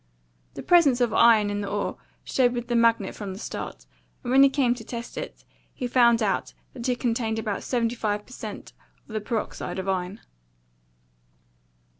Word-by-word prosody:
The - - -6
presence 305 -8 +5
of 240 -3 +1
iron 220 -3 +5
in 205 0 -2
the 200 - -4
ore 205 0 -2 0.3
showed 245 -2 +2
with 240 -1 -4
the 240 - +1
magnet 230 -4 +3
from 200 -3 -6
the 190 - -9
start; - - -6 0.4
and 245 - -3
when 265 +1 +6
he 275 - +8
came 265 -3 +2
to 245 -2 -9
test 235 +1 -7
it, - - -7 0.3
he 255 - -4
found 235 -2 +4
out 195 -3 -1 0.2
that 250 -1 -4
it 245 - 0
contained 230 -2 -1
about 210 -3 -2
seventy 235 -2 0
five 210 -3 -2
per - - -18
cent. 215 -4 -8 0.3
of 220 - -11
the 215 - -2
peroxide 220 -2 -4
of 190 0 -4
iron." 190 +2 -2
230 Hz, 185 wpm, -25 LUFS, 210-245 Hz, 0.4 s, he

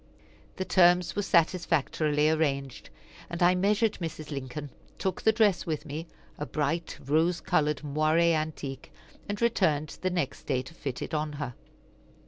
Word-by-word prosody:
The 185 - -3
terms 175 -3 +4
were 205 - +1
satisfactorily 165 -4 +2
arranged, 140 -4 -1 0.4
and 170 +1 -1
I 175 +1 +6
measured 205 +4 +1
Mrs. 155 -2 -5
Lincoln, 140 +1 -5 0.3
took 190 -2 -2
the 220 - +5
dress 210 -6 +2
with 155 -1 -2
me, 155 +3 -5 0.3
a 150 - -2
bright 155 +3 -2
rose 165 +5 +2
colored 150 -1 +1
moiré 155 +3 +3
antique, 155 -4 -4 0.4
and 205 0 -2
returned 165 -11 +1
the 185 - +1
next 175 -7 -3
day 130 -3 0
to 130 - -12
fit 135 -6 -5
it - - -7
on 150 -1 -1
her. 140 -4 -4
155 Hz, 150 wpm, -28 LUFS, 145-180 Hz, 0.4 s, I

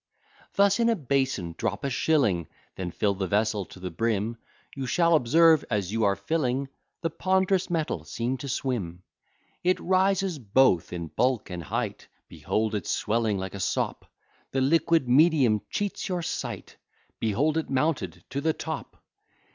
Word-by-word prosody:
Thus 200 +2 +4
in 235 0 +3
a 230 - +3
basin 130 - -1
drop 100 - -2
a 140 - 0
shilling, 125 - +2 0.3
Then 90 -2 -4
fill 100 +4 0
the 95 -1 -3
vessel 105 0 +1
to 95 - -14
the 90 0 -5
brim, 115 +4 -1 0.4
You 135 -2 -4
shall 170 +3 +3
observe, 160 +3 +5
as 100 -4 -1
you 110 0 +1
are 100 -1 +3
filling, 135 - -1 0.3
The 165 -1 -1
pond'rous 190 +2 +1
metal 165 -3 -1
seems 125 +3 -3
to 140 - -6
swim: 95 -11 -3 0.6
It 180 +1 +2
rises 190 -2 +1
both 110 -5 +3
in 85 -2 -5
bulk 120 - 0
and 90 -1 -4
height, 75 - -4 0.2
Behold 110 0 -1
it 105 -5 -3
swelling 110 -1 0
like 95 0 -5
a 100 - -6
sop; 90 - -2 0.4
The 135 - -1
liquid 160 +1 +3
medium 130 -5 +4
cheats 205 -2 -3
your 180 -2 -1
sight: - - -5 0.4
Behold 125 +8 +1
it 160 - -1
mounted 130 - -1
to 140 +2 -2
the 160 +2 +1
top! - - -6
130 Hz, 160 wpm, -27 LUFS, 100-160 Hz, 0.6 s, observe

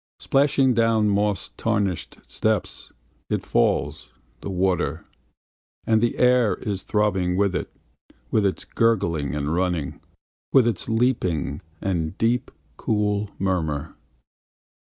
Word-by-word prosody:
Splashing 135 -2 +3
down 115 -2 +3
moss 100 0 0
tarnished 100 -6 -1
steps 110 -3 -2 0.4
It - - -1
falls, - - 0 0.3
the - - -6
water; 90 -5 0 0.8
And 110 -1 +3
the 120 - 0
air 125 -3 +4
is 100 -2 -3
throbbing 95 -4 0
with 100 -1 +2
it. - - -3 0.6
With 110 - +3
its 100 -2 -1
gurgling 85 - +1
and 75 +1 -1
running. 90 -5 -1 0.5
With 130 -3 +6
its 120 -1 -1
leaping, 110 - 0 0.2
and 85 -3 -2
deep, 120 +2 +1 0.3
cool 105 -1 0
murmur. 80 -6 -1
100 Hz, 110 wpm, -24 LUFS, 90-115 Hz, 0.8 s, With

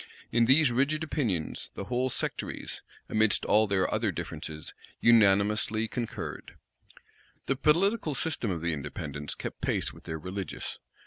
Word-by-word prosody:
In 120 0 +4
these 135 +2 +6
rigid 140 +6 +1
opinions 115 - -1
the - - -4
whole 125 +5 0
sectaries, - - -4 0.3
amidst 110 0 +2
all 110 +1 +4
their 95 -2 +2
other - - +1
differences, 80 0 -6 0.3
unanimously 105 0 +4
concurred. 120 0 -5 0.9
The 135 - +1
political 165 - +2
system 140 -5 0
of 85 -4 -2
the 85 -1 +1
Independents 70 0 -5
kept - - -6
pace - - 0
with - - -15
their 80 - -4
religious. 95 +4 -5
110 Hz, 135 wpm, -29 LUFS, 95-135 Hz, 0.9 s, these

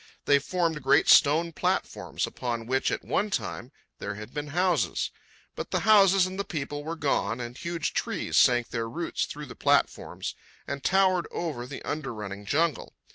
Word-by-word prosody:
They 140 0 +5
formed 165 +1 -1
great 140 +3 +4
stone 160 +3 +6
platforms, - - -1
upon 120 -2 -4
which, 130 +3 +1
at - - -3
one 210 +2 0
time, 130 -9 -4 0.3
there 105 - -4
had 105 +3 -9
been 145 0 -4
houses. 180 +4 0 0.4
But - - -5
the - - 0
houses 195 -3 +6
and 185 +1 -5
the - - +1
people 145 -4 -4
were 165 +2 -4
gone, 125 -7 0
and 120 0 -6
huge 170 +2 -3
trees - - -2
sank 120 -1 +4
their 115 -1 -3
roots 165 +8 -2
through 150 0 -7
the - - -10
platforms - - 0 0.3
and 140 -1 -5
towered 190 -2 +3
over 145 -8 -4
the 135 - -8
under 140 -6 -4
running 100 -1 -7
jungle. 155 +1 0
145 Hz, 175 wpm, -27 LUFS, 125-170 Hz, 0.4 s, stone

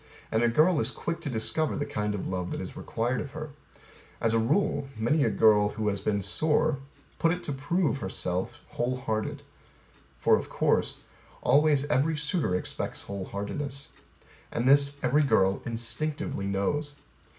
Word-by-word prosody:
And 110 - +2
A 120 - +4
girl 155 +7 +4
is 110 - +1
quick 170 +4 -4
to 150 - -4
discover 125 +7 0
the 145 - -2
kind 105 0 -2
of 100 - -4
love 90 -1 -2
that - - -4
is - - -6
required 120 +3 -2
of 140 - -7
her. 155 -1 -6 0.7
As 115 0 +1
a 115 - +4
rule 145 - +1
Many 130 +7 +2
a - - +3
girl 105 -2 +5
who 105 0 -1
has 100 -1 -2
been 100 -2 0
sore 150 0 +2 0.4
put 165 - +4
to 170 - +2
it 180 - -12
to - - -4
prove 145 +2 0
herself 95 -3 -3
whole 125 +1 -1
hearted. 110 -4 -3 0.7
For - - +4
of - - -6
course, - - +1 0.4
Always 145 -1 +4
every 150 +3 +1
suitor 150 - 0
expects 90 - -4
whole 100 -1 -5
heartedness. 135 +9 -5 0.6
And 120 +2 -1
this 140 +1 +5
every 135 +4 +4
girl 100 -8 +3
instinctively 115 -1 -2
knows. 145 +10 -1
130 Hz, 170 wpm, -28 LUFS, 105-150 Hz, 0.7 s, girl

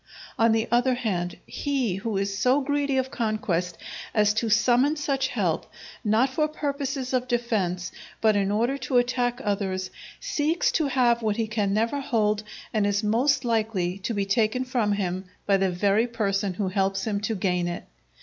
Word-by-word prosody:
On 230 0 +5
the 225 0 +1
other 245 +2 +3
hand, 180 -8 -2
he 260 -10 -1
who 210 0 -2
is 195 0 -1
so 250 +8 +3
greedy 285 -1 0
of 260 0 -1
conquest 215 -6 -1 0.4
as 210 -1 +4
to 225 +1 -1
summon 245 +6 +4
such 275 -3 0
help, - - -1 0.3
not 225 +5 +2
for 305 +3 +1
purposes 280 -3 -3
of 255 0 +1
defence 205 -7 -1 0.3
but 220 -2 +3
in 200 -1 +1
order 235 +7 0
to 260 - 0
attack 245 0 +1
others, 190 -2 -2 0.3
seeks 310 +3 0
to 315 -3 +1
have 245 -3 +2
what 215 -2 0
he 225 - +1
can 215 -2 -1
never 225 +7 +1
hold 215 -6 +1 0.3
and 210 -2 +2
is 205 +1 0
most 260 +5 +2
likely 215 -5 0
to 220 +4 -3
be 200 -1 0
taken 220 +5 +1
from 240 -5 +1
him 190 -2 -2 0.2
by 200 -1 +4
the 190 0 +1
very 200 +5 +2
person 200 -4 -1
who 195 0 -1
helps 195 0 0
him 205 -2 -1
to 220 +2 -1
gain 180 -2 0
it. 175 0 -4
220 Hz, 180 wpm, -26 LUFS, 200-255 Hz, 0.4 s, On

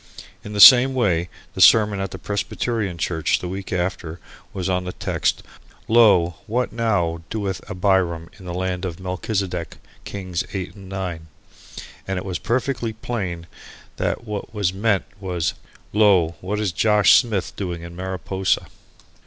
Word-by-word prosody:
In 105 - -8
the 105 - -3
same 130 +4 +9
way 90 -8 +1 0.2
the - - -3
sermon 105 -3 +6
at 95 0 -2
the - - -8
Presbyterian 105 -1 -2
church 80 -2 0
the 90 - -6
week 95 +2 -6
after 90 -2 -3 0.3
was 95 -2 -4
on 90 -1 0
the 90 - -5
text - - -1 0.4
"Lo 100 -8 +5
what 125 +3 -1
now 100 -8 0
doeth 100 -3 -3
Abiram 90 -3 +1
in 95 - -12
the 90 - -5
land 90 0 -2
of 85 -3 -4
Melchisideck 90 -1 -3 0.3
Kings 90 -3 -4
Eight 95 -3 -4
and 95 -2 -13
Nine?" 90 -4 -5 0.8
and 95 0 -2
it 90 - -4
was 90 -3 -3
perfectly 120 -1 -1
plain 95 -7 -4 0.5
that - - -2
what 105 0 -6
was 100 -3 0
meant 100 0 +1
was, 90 -4 -2 0.4
"Lo, 100 -6 +4
what 105 +3 -3
is 105 -4 0
Josh 105 +1 +4
Smith 105 -8 +2
doing 90 -4 -4
in 85 0 -9
Mariposa?" 95 +1 -1
95 Hz, 155 wpm, -22 LUFS, 90-105 Hz, 0.8 s, same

